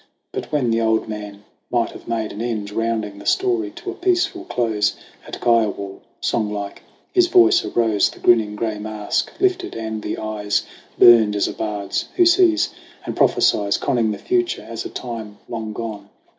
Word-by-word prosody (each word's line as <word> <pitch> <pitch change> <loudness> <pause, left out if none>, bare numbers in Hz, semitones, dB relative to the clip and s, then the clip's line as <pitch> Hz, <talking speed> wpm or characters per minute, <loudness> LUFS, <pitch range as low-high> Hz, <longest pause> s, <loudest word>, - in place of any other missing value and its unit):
But - - -5
when 130 -6 +1
the 115 0 +2
old 110 0 +1
man 105 -1 -7 0.3
might 120 -2 0
have - - -13
made 115 -2 -2
an 105 - -6
end, 110 -4 -3
Rounding 110 -2 -2
the - - -12
story 370 -2 +1
to 345 +2 -5
a - - -6
peaceful 360 -1 0
close 110 - 0 0.3
At - - -7
Kiowa, 105 -4 +1 0.2
songlike 105 -2 -2 0.3
his 360 -1 +5
voice 360 +1 +5
arose, 110 -4 +2
The - - -13
grinning 110 -3 +3
gray 110 -1 -2
mask 105 0 -2
lifted 375 -1 0
and 110 -1 -4
the - - -4
eyes 105 -1 -1 0.3
Burned 110 -3 +7
as 100 - +1
a - - -4
bard's 105 -2 -3
who 355 - +5
sees 345 -2 +4 0.3
and - - -4
prophesies, 100 -1 +3
Conning 115 -3 +1
the 105 - -2
future 360 -1 -1
as 115 -1 -5
a - - -4
time 110 -4 -7
long 110 -2 -5
gone. 105 -2 -6
115 Hz, 170 wpm, -21 LUFS, -, 0.3 s, Burned